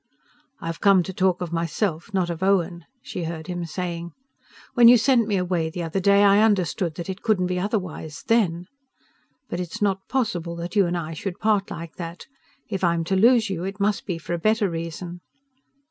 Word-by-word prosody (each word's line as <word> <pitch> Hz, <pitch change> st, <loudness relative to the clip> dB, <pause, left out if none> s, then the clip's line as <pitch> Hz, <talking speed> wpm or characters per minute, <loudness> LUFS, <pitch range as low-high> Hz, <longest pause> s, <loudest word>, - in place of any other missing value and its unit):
"I've 165 Hz, 0 st, -5 dB
come 195 Hz, -3 st, +5 dB
to 190 Hz, -, -6 dB
talk 185 Hz, -1 st, +1 dB
of 170 Hz, -2 st, -4 dB
myself, 170 Hz, +2 st, -2 dB
not 185 Hz, -3 st, 0 dB
of 170 Hz, 0 st, -6 dB
Owen," 180 Hz, -3 st, +1 dB, 0.2 s
she 175 Hz, -, -5 dB
heard 160 Hz, -1 st, -5 dB
him 175 Hz, -2 st, -4 dB
saying. 170 Hz, 0 st, -5 dB, 0.6 s
"When 240 Hz, -3 st, +7 dB
you 245 Hz, +1 st, +9 dB
sent 235 Hz, -1 st, +3 dB
me 205 Hz, -3 st, +1 dB
away 175 Hz, -3 st, 0 dB
the 175 Hz, +1 st, -5 dB
other 165 Hz, +4 st, -2 dB
day 200 Hz, +2 st, +5 dB
I 200 Hz, +1 st, +6 dB
understood 180 Hz, -6 st, +1 dB
that 170 Hz, -, -6 dB
it 190 Hz, 0 st, -5 dB
couldn't 205 Hz, -5 st, +2 dB
be 180 Hz, 0 st, -1 dB
otherwise 180 Hz, -6 st, -4 dB
then. 180 Hz, -7 st, +2 dB, 0.8 s
But 175 Hz, -, -4 dB
it's 180 Hz, +4 st, -5 dB
not 195 Hz, -2 st, 0 dB
possible 180 Hz, -10 st, -1 dB
that 170 Hz, +4 st, -6 dB
you 200 Hz, -3 st, +4 dB
and 175 Hz, +1 st, -1 dB
I 165 Hz, -1 st, -4 dB
should 180 Hz, +3 st, -5 dB
part 210 Hz, -2 st, +1 dB
like 165 Hz, 0 st, -8 dB
that. 170 Hz, 0 st, -7 dB, 0.4 s
If 195 Hz, -3 st, -4 dB
I'm 170 Hz, -1 st, +2 dB
to 190 Hz, +4 st, -1 dB
lose 225 Hz, +1 st, +4 dB
you, 175 Hz, -2 st, -3 dB
it 195 Hz, +2 st, -5 dB
must 200 Hz, +1 st, 0 dB
be 180 Hz, -4 st, -2 dB
for 165 Hz, +1 st, -5 dB
a 170 Hz, -, -1 dB
better 215 Hz, 0 st, +2 dB
reason." 170 Hz, +1 st, -6 dB
180 Hz, 200 wpm, -24 LUFS, 170-200 Hz, 0.8 s, you